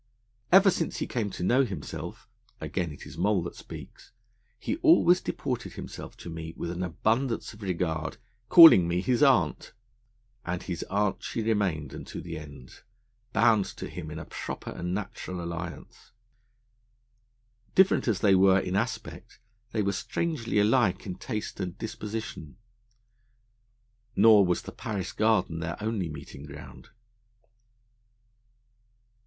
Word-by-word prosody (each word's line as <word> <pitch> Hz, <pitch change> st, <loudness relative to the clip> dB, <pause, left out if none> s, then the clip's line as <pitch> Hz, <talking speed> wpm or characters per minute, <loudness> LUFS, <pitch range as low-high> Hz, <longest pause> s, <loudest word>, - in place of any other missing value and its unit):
'Ever 195 Hz, +1 st, +7 dB
since 165 Hz, -, -2 dB
he -, -, -2 dB
came 115 Hz, -4 st, -2 dB
to 90 Hz, -, -6 dB
know 125 Hz, +8 st, +4 dB
himself,' 95 Hz, -, -6 dB, 0.3 s
again 85 Hz, -4 st, -3 dB
it 75 Hz, -, -11 dB
is -, -, -10 dB
Moll 100 Hz, -4 st, +2 dB
that 85 Hz, -, -6 dB
speaks, -, -, -11 dB, 0.5 s
'he 270 Hz, -, -3 dB
always 320 Hz, -, +5 dB
deported 125 Hz, -4 st, -4 dB
himself -, -, -8 dB
to -, -, -10 dB
me 80 Hz, 0 st, -7 dB
with 85 Hz, -, -3 dB
an 90 Hz, +1 st, -4 dB
abundance 115 Hz, -, -1 dB
of 105 Hz, -, -15 dB
regard, 85 Hz, -4 st, -2 dB, 0.3 s
calling 160 Hz, -, +10 dB
me 85 Hz, +1 st, 0 dB
his 125 Hz, +4 st, +1 dB
Aunt.' 130 Hz, -, +3 dB, 0.7 s
And 90 Hz, 0 st, -3 dB
his 85 Hz, -3 st, -4 dB
aunt 100 Hz, 0 st, 0 dB
she 115 Hz, -, -3 dB
remained 95 Hz, -10 st, 0 dB
unto -, -, -7 dB
the 85 Hz, -1 st, -6 dB
end, 70 Hz, -4 st, -13 dB, 0.5 s
bound 115 Hz, -5 st, +4 dB
to -, -, -5 dB
him 80 Hz, -3 st, -7 dB
in 75 Hz, -, -7 dB
a 80 Hz, -, -7 dB
proper -, -, -6 dB
and 90 Hz, 0 st, -4 dB
natural 95 Hz, -2 st, -5 dB
alliance. 85 Hz, +2 st, -7 dB, 1.6 s
Different 190 Hz, -6 st, +4 dB
as 110 Hz, -5 st, +1 dB
they 100 Hz, -2 st, +5 dB
were 95 Hz, 0 st, +6 dB
in 90 Hz, 0 st, -3 dB
aspect, 110 Hz, +3 st, -4 dB, 0.3 s
they 110 Hz, -2 st, 0 dB
were 100 Hz, -, +1 dB
strangely 125 Hz, -, -2 dB
alike 105 Hz, -1 st, +3 dB
in 95 Hz, -, -4 dB
taste 105 Hz, +3 st, -5 dB
and 90 Hz, -1 st, -4 dB
disposition. 105 Hz, -8 st, -6 dB, 1.6 s
Nor 105 Hz, -2 st, +7 dB
was 90 Hz, -, 0 dB
the -, -, -8 dB
Paris 105 Hz, -8 st, -4 dB
Garden 110 Hz, -7 st, +1 dB
their 85 Hz, +1 st, -4 dB
only 105 Hz, -5 st, -2 dB
meeting 75 Hz, -1 st, -9 dB
ground. 75 Hz, 0 st, -11 dB
100 Hz, 140 wpm, -28 LUFS, 85-115 Hz, 1.6 s, calling